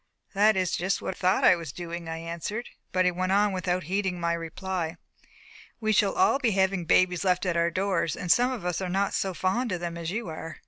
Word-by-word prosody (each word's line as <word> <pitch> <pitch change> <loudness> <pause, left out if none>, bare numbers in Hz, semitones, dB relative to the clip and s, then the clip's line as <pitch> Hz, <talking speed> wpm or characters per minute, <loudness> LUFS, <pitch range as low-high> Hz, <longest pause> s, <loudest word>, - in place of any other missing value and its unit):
"That 210 +1 +4
is 185 -2 +1
just 190 +2 0
what - - -2
I - - -20
thought 185 +1 +2
I - - +7
was 165 -5 -6
doing," 170 0 -6
I 165 - -4
answered; 170 +8 -5 0.2
but 185 0 +2
he 180 - +4
went 185 +2 -1
on 205 +1 +3
without 185 -1 -1
heeding 190 +1 -1
my 170 0 0
reply 170 0 -4 0.8
"We 215 -2 0
shall 200 -1 +3
all 370 -7 +3
be 245 - +2
having 190 -2 +1
babies 180 +2 +3
left 180 0 +1
at 180 -2 0
our 170 0 +2
doors, 180 -2 0
and 175 - -1
some 245 +1 +4
of 235 -8 -5
us 180 +1 -1
are 185 - -2
not 195 +2 0
so 190 -2 -1
fond 215 +7 0
of 180 - -1
them 170 -1 -5
as 165 -1 -4
you 220 +3 -3
are. 160 0 -7
185 Hz, 235 wpm, -27 LUFS, 170-195 Hz, 0.8 s, I